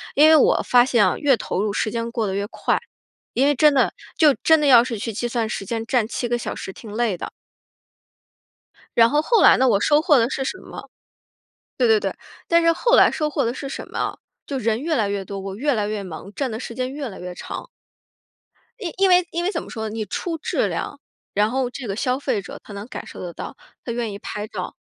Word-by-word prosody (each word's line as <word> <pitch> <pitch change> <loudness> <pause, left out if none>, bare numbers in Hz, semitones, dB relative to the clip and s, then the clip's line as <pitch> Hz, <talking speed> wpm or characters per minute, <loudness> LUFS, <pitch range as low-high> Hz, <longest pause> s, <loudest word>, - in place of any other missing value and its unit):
因 305 +3 +7
为 315 - +8
我 - - +3
发 245 0 +5
现 235 -5 +3
越 280 -3 +4
投 190 - -3
入， 205 -1 -1
时 215 - -1
间 230 0 -3
过 230 -2 -2
得 190 - -2
越 200 +1 -2
快。 - - -1 0.5
因 265 +3 +3
为 290 - +3
真 300 +2 +5
的， 265 - +2 0.2
就 300 -3 +6
真 320 -1 +6
的 295 - +1
要 240 -3 +8
是 235 -4 -4
去 225 +1 -4
计 240 +3 -2
算 235 -2 -1
时 210 - -4
间 225 +2 -3
站 240 -2 +1
7 245 0 -3
个 240 0 0
小 - - -5
时 190 - -7
挺 215 -3 -11
累 225 -4 0
的。 - - -6 1.7
然 230 0 +7
后 295 +1 +3
后 455 +7 +3
来 - - +7
呢， 260 0 +3
我 200 -3 +3
收 295 +8 +3
获 305 -5 +4
的 230 - +3
是 270 +1 -3
什 375 +8 -3
么？ - - -11 0.9
对 - - +3
对 445 -1 +5
对。 - - -2 0.4
但 335 0 +4
是 335 0 +5
后 485 +8 +3
来 - - +6
收 305 -1 -1
获 290 - 0
的 235 - -1
是 275 0 -6
什 - - -6
么 - - -6
啊？ - - -2 0.3
就 275 - -3
是 220 - -8
人 225 +2 +1
越 320 0 0
来 210 -4 +1
越 200 -1 -2
多， 200 0 -6
我 195 0 -6
越 275 +4 0
来 210 -1 0
越 210 -1 -3
忙， 185 +2 -9
站 275 +2 -2
的 220 0 -5
时 235 - -7
间 255 +2 -3
越 280 -2 -5
来 190 - -9
越 180 0 -7
长。 - - -7 1.1
因 360 -7 -4
因 390 -1 +4
为 360 -1 +5
因 345 +1 -2
为 380 - 0
怎 - - -3
么 - - -11
说， 220 -2 -4
你 215 0 -4
出 330 - -3
质 - - -1
量， - - -4 0.3
然 210 +1 +2
后 255 0 -1
这 250 -2 -7
个 195 - -3
消 255 +3 0
费 210 -7 -1
者 - - -10
他 205 - -11
能 200 +3 -7
感 - - -7
受 - - -10
得 175 -1 -6
到， 260 - -8 0.3
他 235 - -4
愿 230 -3 -3
意 200 - -8
拍 210 +1 -5
照， - - -6
240 Hz, 265 characters per minute, -22 LUFS, 215-290 Hz, 1.7 s, 为